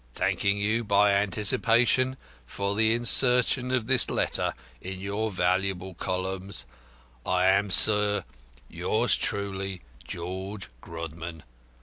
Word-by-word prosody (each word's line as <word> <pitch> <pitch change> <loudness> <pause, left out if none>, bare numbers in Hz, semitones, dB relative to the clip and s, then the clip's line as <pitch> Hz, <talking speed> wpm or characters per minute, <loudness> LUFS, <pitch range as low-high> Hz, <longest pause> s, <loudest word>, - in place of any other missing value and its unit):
Thanking 100 0 0
you 110 +3 0
by 100 -1 +3
anticipation 115 +6 +3 0.3
for 100 +8 -3
the 110 +1 +3
insertion 125 +1 +2
of 130 -3 0
this 130 0 +3
letter - - -1 0.3
in 95 0 -6
your 100 +3 -3
valuable 95 0 -1
columns, 95 -4 -4 0.6
I 90 0 0
am, 100 +2 +2
sir, 105 0 +3 0.4
yours - - 0
truly, 95 -2 -3 0.2
"George 95 +6 -6
Grodman. 80 0 -8
100 Hz, 105 wpm, -26 LUFS, 95-110 Hz, 0.6 s, by